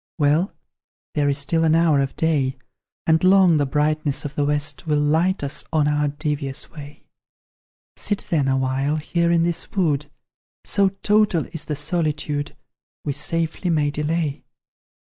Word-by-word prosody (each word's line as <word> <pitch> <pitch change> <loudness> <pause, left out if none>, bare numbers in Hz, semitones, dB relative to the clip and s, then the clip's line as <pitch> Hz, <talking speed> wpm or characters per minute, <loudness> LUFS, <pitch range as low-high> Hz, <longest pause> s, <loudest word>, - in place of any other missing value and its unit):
Well, 155 +4 +2 0.6
there 145 -1 +1
is 140 - 0
still 160 +3 0
an 160 0 +4
hour 165 -3 +4
of 135 -1 -3
day, 140 -5 0 0.5
And 160 +1 +3
long 185 -3 +6
the 145 -1 +1
brightness 150 0 0
of 145 - -4
the 145 - 0
West 145 +2 -2
Will 150 -1 +2
light 160 +5 +1
us 140 +2 -2
on 155 -2 +2
our 150 0 +1
devious 145 -1 -3
way; 145 -2 -11 0.9
Sit 205 - -2
then, 150 -5 +2
awhile, 135 +2 0
here 170 +2 0
in 170 -1 +3
this 170 0 -2
wood 150 -6 +1 0.6
So 200 -1 +3
total 205 -3 +2
is 160 -2 -5
the 150 - -3
solitude, 150 -1 -2 0.5
We 145 - -1
safely 165 +4 -1
may 150 -3 +1
delay. 150 0 -2
150 Hz, 150 wpm, -22 LUFS, 145-165 Hz, 0.9 s, long